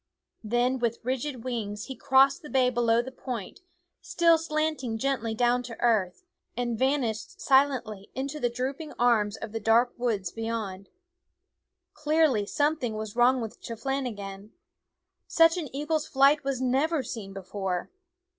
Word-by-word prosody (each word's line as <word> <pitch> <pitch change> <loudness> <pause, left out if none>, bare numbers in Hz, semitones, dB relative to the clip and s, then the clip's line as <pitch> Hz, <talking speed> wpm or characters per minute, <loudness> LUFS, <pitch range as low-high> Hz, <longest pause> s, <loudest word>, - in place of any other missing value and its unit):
Then 240 +4 +1
with 235 -1 0
rigid 255 0 -3
wings 210 -5 -4
he 265 - -7
crossed 270 +4 +4
the 300 - -10
bay 255 -2 +3
below 235 -1 +2
the 260 - -8
point, 245 -6 -6 0.4
still 335 -1 +3
slanting 310 -7 -1
gently 230 -3 -1
down 245 +2 +2
to 235 -2 -9
earth, 215 - +1 0.3
and 240 -1 -1
vanished 245 -3 -1
silently 255 -7 +2
into 275 +3 -4
the 245 - +1
drooping 265 +6 -4
arms 225 -4 +2
of 225 - -7
the 225 - -3
dark 225 +3 +3
woods 210 -7 -1
beyond. 220 -4 -4 1.0
Clearly 300 -8 +2
something 290 -6 0
was 215 0 -5
wrong 245 +1 +4
with 225 -2 -7
Chep 230 -2 -8
lahgan. 210 -7 -4 0.7
Such 330 +1 +5
an 315 -6 -4
eagle's 300 +3 -1
flight 275 +2 +4
was 270 -2 -2
never 270 +4 +1
seen 220 -5 -6
before. 190 - -4
245 Hz, 145 wpm, -27 LUFS, 220-275 Hz, 1.0 s, Such